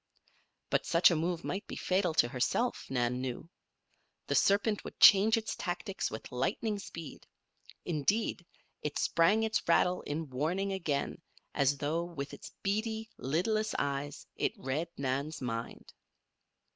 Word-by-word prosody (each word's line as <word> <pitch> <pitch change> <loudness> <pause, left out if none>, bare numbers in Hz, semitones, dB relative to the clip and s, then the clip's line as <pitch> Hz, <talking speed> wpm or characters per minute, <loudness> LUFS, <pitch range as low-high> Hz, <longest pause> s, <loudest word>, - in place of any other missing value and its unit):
But - - +1
such 170 +2 +6
a - - +2
move 170 +1 -1
might 195 - -4
be - - -6
fatal 185 -3 0
to 120 - +5
herself, 130 - -1
Nan 125 -1 0
knew. 130 +4 -4 0.8
The - - -1
serpent 205 +1 +3
would - - -9
change 210 +3 +8
its 220 0 -3
tactics - - -3
with - - -8
lightning 215 -3 -1
speed. 165 -5 -9 0.6
Indeed, 175 +5 0 0.4
it 150 - -3
sprang 195 +7 +3
its 220 -2 +1
rattle 180 +2 +3
in 150 -1 -4
warning 175 +9 -1
again 165 -3 -2 0.3
as 140 0 +2
though, 155 +4 -1
with 150 -5 -6
its - - -9
beady, 220 +2 -1
lidless 215 - 0
eyes, 140 0 -2
it - - 0
read 140 +6 -2
Nan's 140 +3 -2
mind. 115 -3 -5
165 Hz, 140 wpm, -32 LUFS, 140-200 Hz, 0.8 s, change